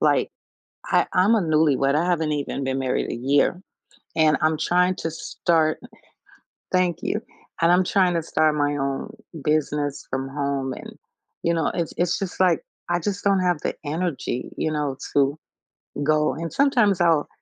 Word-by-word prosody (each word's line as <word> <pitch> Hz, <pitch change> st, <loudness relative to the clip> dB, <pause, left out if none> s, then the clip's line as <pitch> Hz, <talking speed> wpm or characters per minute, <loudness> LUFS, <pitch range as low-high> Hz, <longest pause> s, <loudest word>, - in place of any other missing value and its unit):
like, -, -, +2 dB, 0.6 s
I -, -, +3 dB
I'm 190 Hz, +5 st, +4 dB
a 225 Hz, -, +3 dB
newlywed, 150 Hz, -4 st, +2 dB
I 165 Hz, -, +2 dB
haven't 165 Hz, -3 st, 0 dB
even 140 Hz, -1 st, -3 dB
been 135 Hz, 0 st, -1 dB
married 130 Hz, -1 st, -1 dB
a -, -, -2 dB
year, 140 Hz, +8 st, +2 dB, 0.6 s
and 155 Hz, -1 st, +4 dB
I'm 155 Hz, 0 st, +2 dB
trying 180 Hz, +3 st, +2 dB
to 165 Hz, -, -3 dB
start 160 Hz, 0 st, 0 dB, 0.9 s
Thank 180 Hz, -2 st, +1 dB
you. -, -, -1 dB, 0.4 s
And 170 Hz, +1 st, +5 dB
I'm 180 Hz, +1 st, +4 dB
trying 185 Hz, -3 st, +2 dB
to 165 Hz, -, +1 dB
start 155 Hz, -1 st, +2 dB
my 145 Hz, -1 st, +1 dB
own 135 Hz, -1 st, -3 dB, 0.3 s
business 150 Hz, -2 st, -1 dB
from 135 Hz, 0 st, -2 dB
home 140 Hz, -1 st, -2 dB
and, -, -, -10 dB, 0.5 s
you 170 Hz, -, +2 dB
know, 165 Hz, -2 st, 0 dB
it's 170 Hz, -3 st, -2 dB
it's 175 Hz, -1 st, +1 dB
just, 195 Hz, -2 st, -5 dB
like, 185 Hz, -, +3 dB, 0.3 s
I 175 Hz, 0 st, +1 dB
just 200 Hz, +3 st, -3 dB
don't 200 Hz, -1 st, +3 dB
have 180 Hz, -3 st, +1 dB
the -, -, -2 dB
energy, 155 Hz, -5 st, -3 dB
you 155 Hz, -, -1 dB
know, 145 Hz, -3 st, -2 dB, 0.2 s
to 140 Hz, +1 st, +2 dB, 0.7 s
go, 155 Hz, +1 st, +2 dB
and 165 Hz, 0 st, -5 dB
sometimes 240 Hz, -, +3 dB
I'll 165 Hz, -4 st, +3 dB
155 Hz, 170 wpm, -23 LUFS, 145-180 Hz, 0.9 s, And